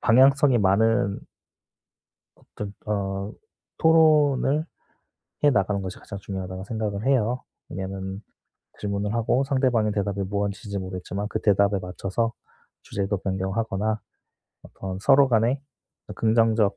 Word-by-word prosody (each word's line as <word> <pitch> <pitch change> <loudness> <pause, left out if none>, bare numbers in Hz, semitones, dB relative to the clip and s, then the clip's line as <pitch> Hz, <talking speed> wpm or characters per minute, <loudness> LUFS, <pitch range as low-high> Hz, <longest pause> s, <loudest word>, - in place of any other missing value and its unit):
방향성이 135 +2 +5
많은 100 +1 +2 1.2
어떤 100 -1 -8
어 100 0 -2 0.5
'토론을 155 -2 +4 0.8
해 145 - +7
나가는 100 -2 +1
것이 95 0 -6
가장 100 -2 -8
중요하다.'고 95 -1 -6
생각을 110 -1 -3
해요. 125 -2 +1 0.3
왜냐하면 95 +1 -5 0.6
질문을 100 0 -2
하고 115 +3 +1
상대방의 130 -6 +1
대답이 100 -1 -1
무언지 100 +2 -3
잘 100 - -2
모르겠지만 95 +2 -5
그 - - -2
대답에 100 -1 +3
맞춰서 95 +5 -2 0.5
주제도 100 0 -2
변경하거나 100 +3 -2 0.6
어떤 95 -1 -7
서로 135 +4 +5
간에 120 +4 +2 0.5
어떤 - - -7
긍정적 110 -2 +3
105 Hz, 290 characters per minute, -25 LUFS, 95-120 Hz, 1.2 s, 해